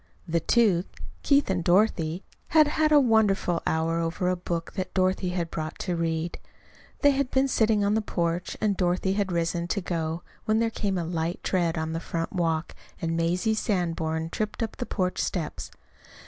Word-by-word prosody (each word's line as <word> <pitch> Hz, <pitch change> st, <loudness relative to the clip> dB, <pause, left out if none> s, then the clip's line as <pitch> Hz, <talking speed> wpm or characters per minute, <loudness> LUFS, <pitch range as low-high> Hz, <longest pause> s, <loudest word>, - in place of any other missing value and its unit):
The 170 Hz, 0 st, +1 dB
two, 195 Hz, -2 st, +3 dB, 0.4 s
Keith 285 Hz, 0 st, +3 dB
and 180 Hz, -2 st, -1 dB
Dorothy, 175 Hz, -2 st, +2 dB, 0.2 s
had 310 Hz, -1 st, +5 dB
had 310 Hz, 0 st, +2 dB
a 295 Hz, -, +8 dB
wonderful 210 Hz, -8 st, +2 dB
hour 165 Hz, +1 st, +1 dB
over 170 Hz, +2 st, -1 dB
a 185 Hz, -, +1 dB
book 170 Hz, -1 st, -4 dB
that 185 Hz, -1 st, -4 dB
Dorothy 185 Hz, 0 st, +1 dB
had 175 Hz, -2 st, -2 dB
brought 155 Hz, 0 st, -4 dB
to 180 Hz, -2 st, -2 dB
read. 165 Hz, 0 st, -2 dB, 0.6 s
They 285 Hz, -, +6 dB
had 275 Hz, -1 st, 0 dB
been 265 Hz, +1 st, +2 dB
sitting 220 Hz, -5 st, +2 dB
on 200 Hz, -, +2 dB
the 220 Hz, -, +2 dB
porch, 170 Hz, -3 st, -2 dB
and 210 Hz, -2 st, +1 dB
Dorothy 185 Hz, +1 st, +1 dB
had 200 Hz, -2 st, -1 dB
risen 170 Hz, 0 st, -1 dB
to 200 Hz, -, -1 dB
go 165 Hz, -2 st, -3 dB, 0.2 s
when 215 Hz, 0 st, +2 dB
there 230 Hz, 0 st, +1 dB
came 200 Hz, -4 st, -1 dB
a 170 Hz, -, -2 dB
light 165 Hz, +1 st, -2 dB
tread 170 Hz, -3 st, 0 dB
on 160 Hz, 0 st, -2 dB
the 165 Hz, -, -2 dB
front 165 Hz, +1 st, -4 dB
walk 165 Hz, -3 st, -1 dB, 0.3 s
and 165 Hz, 0 st, -1 dB
Mazie 175 Hz, +6 st, +1 dB
Sanborn 165 Hz, -6 st, -1 dB
tripped 215 Hz, +2 st, -2 dB
up 225 Hz, -, -5 dB
the 245 Hz, -, -4 dB
porch 185 Hz, -3 st, -1 dB
steps. 170 Hz, -5 st, -3 dB
180 Hz, 185 wpm, -26 LUFS, 165-210 Hz, 0.6 s, a